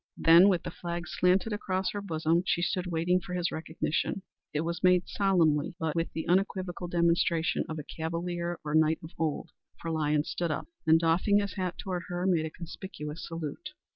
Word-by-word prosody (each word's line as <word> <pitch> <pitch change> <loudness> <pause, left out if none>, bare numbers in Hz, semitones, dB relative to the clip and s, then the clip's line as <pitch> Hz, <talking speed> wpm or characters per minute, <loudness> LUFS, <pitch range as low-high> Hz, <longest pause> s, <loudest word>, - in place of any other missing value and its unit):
Then 170 +4 +7
with 180 -3 +1
the - - -5
flag 170 0 -5
slanted 185 +4 +2
across 190 -2 -1
her 205 - -4
bosom, 165 -2 +1
she 175 -2 0
stood 180 0 -1
waiting 175 +1 +1
for 180 0 -6
his 180 -1 0
recognition. 160 +3 -2 0.3
It 150 - -1
was 170 +1 -3
made 180 -1 +4
solemnly, 170 -6 +2
but 160 -3 -1
with 165 0 -1
the 160 - -4
unequivocal 185 -1 0
demonstration 170 -1 +2
of 160 - -4
a 150 - -5
cavalier 170 +2 -3
or 150 - -2
knight 160 0 +4
of 160 - -9
old, 160 -3 -2 0.3
for 165 - -4
Lyons 150 -1 +1
stood 170 -1 -1
up, 155 - -2 0.2
and 160 +1 +6
doffing 170 +5 +3
his 200 -2 0
hat 185 -3 -3
toward 185 -2 -4
her, 175 0 -3
made 170 -4 +2
a - - -6
conspicuous 165 -1 -7
salute. 165 - -6
170 Hz, 190 wpm, -29 LUFS, 160-180 Hz, 0.3 s, Then